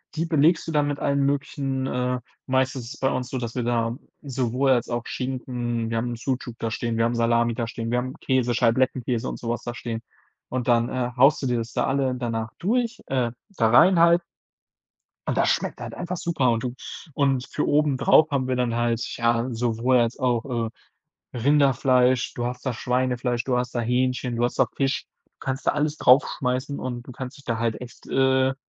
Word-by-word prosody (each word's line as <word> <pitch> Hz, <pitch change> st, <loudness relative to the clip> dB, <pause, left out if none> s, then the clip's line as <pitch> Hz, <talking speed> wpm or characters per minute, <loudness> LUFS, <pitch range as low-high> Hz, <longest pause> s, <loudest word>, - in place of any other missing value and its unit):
Die 165 Hz, +1 st, 0 dB
belegst 160 Hz, +1 st, +3 dB
du 165 Hz, -, -3 dB
dann 145 Hz, -1 st, +2 dB
mit 145 Hz, -1 st, -2 dB
allen 140 Hz, -1 st, +1 dB
möglichen, 135 Hz, -1 st, -1 dB
äh 125 Hz, 0 st, -1 dB, 0.3 s
meist 130 Hz, +1 st, +1 dB
ist 130 Hz, -, -5 dB
es -, -, -13 dB
bei 135 Hz, -, +2 dB
uns 125 Hz, -1 st, -2 dB
so, 130 Hz, -, -3 dB
dass 120 Hz, -2 st, -4 dB
wir 125 Hz, -, -1 dB
da 115 Hz, -1 st, 0 dB, 0.3 s
sowohl 130 Hz, -1 st, 0 dB
als 120 Hz, -2 st, +2 dB
auch 120 Hz, 0 st, -2 dB
Schinken 120 Hz, -3 st, -3 dB
wir 115 Hz, -, -2 dB
haben 120 Hz, +1 st, -2 dB
Sucuk 125 Hz, -1 st, -3 dB
da 115 Hz, -, -1 dB
stehen, 115 Hz, 0 st, -2 dB
wir 115 Hz, -, +3 dB
haben 115 Hz, +1 st, 0 dB
Salami 115 Hz, 0 st, +2 dB
da 115 Hz, 0 st, -2 dB
stehen, 115 Hz, 0 st, -5 dB
wir 120 Hz, -, +2 dB
haben 130 Hz, +1 st, -4 dB
Käse, 130 Hz, -2 st, +1 dB
Scheiblettenkäse 125 Hz, +1 st, +1 dB
und -, -, -6 dB
so 115 Hz, -, -5 dB
was 120 Hz, -, -2 dB
da 120 Hz, -, -4 dB
stehen. 115 Hz, -2 st, -5 dB, 0.5 s
Und 130 Hz, -1 st, -3 dB
dann, 120 Hz, 0 st, +3 dB
äh, 125 Hz, -1 st, -2 dB
haust 135 Hz, +4 st, +5 dB
du 135 Hz, -, -1 dB
dir 125 Hz, -1 st, +1 dB
das 115 Hz, +1 st, -5 dB
da -, -, +1 dB
alle 135 Hz, -1 st, +1 dB
danach 115 Hz, -3 st, -3 dB
durch 235 Hz, +4 st, 0 dB
äh, 125 Hz, -3 st, 0 dB, 0.2 s
da 115 Hz, -, +2 dB
rein 170 Hz, +9 st, +6 dB
halt 170 Hz, +1 st, +6 dB, 1.1 s
und -, -, -1 dB
das -, -, +3 dB
schmeckt -, -, -1 dB
halt -, -, -6 dB
einfach 175 Hz, +1 st, -4 dB
super 155 Hz, -7 st, +1 dB
und 115 Hz, -1 st, 0 dB
du 125 Hz, -1 st, -3 dB, 0.4 s
Und 135 Hz, -3 st, +1 dB
für 150 Hz, -, -1 dB
obendrauf 150 Hz, +1 st, +4 dB
haben 135 Hz, -3 st, 0 dB
wir 130 Hz, -, 0 dB
dann 125 Hz, -2 st, 0 dB
halt, 120 Hz, -1 st, 0 dB, 0.2 s
ja, 115 Hz, +1 st, +1 dB
sowohl 120 Hz, +2 st, +1 dB
als 120 Hz, 0 st, +1 dB
auch, 120 Hz, -1 st, 0 dB
äh, -, -, -6 dB, 0.7 s
Rinderfleisch, 130 Hz, -1 st, +3 dB
du 120 Hz, -, -3 dB
hast 125 Hz, +1 st, -5 dB
da 130 Hz, -, 0 dB
Schweinefleisch, 125 Hz, 0 st, 0 dB
du 125 Hz, -2 st, +1 dB
hast 125 Hz, -1 st, -2 dB
da 120 Hz, -, -1 dB
Hähnchen, 125 Hz, +1 st, 0 dB
du 120 Hz, -, 0 dB
hast 120 Hz, -, -1 dB
da -, -, +6 dB
Fisch. 135 Hz, -1 st, 0 dB, 0.2 s
Du -, -, -40 dB
kannst 130 Hz, +1 st, -4 dB
da -, -, +4 dB
alles 150 Hz, 0 st, 0 dB
drauf 130 Hz, +3 st, +6 dB, 0.2 s
schmeißen 130 Hz, +1 st, -1 dB
und 120 Hz, -2 st, -4 dB
du -, -, -8 dB
kannst 130 Hz, +2 st, -7 dB
dich 140 Hz, -, -17 dB
da 115 Hz, -2 st, -1 dB
halt 115 Hz, -1 st, -1 dB
echt, 125 Hz, -1 st, -11 dB
äh, 130 Hz, 0 st, +3 dB
125 Hz, 215 wpm, -24 LUFS, 120-135 Hz, 1.1 s, rein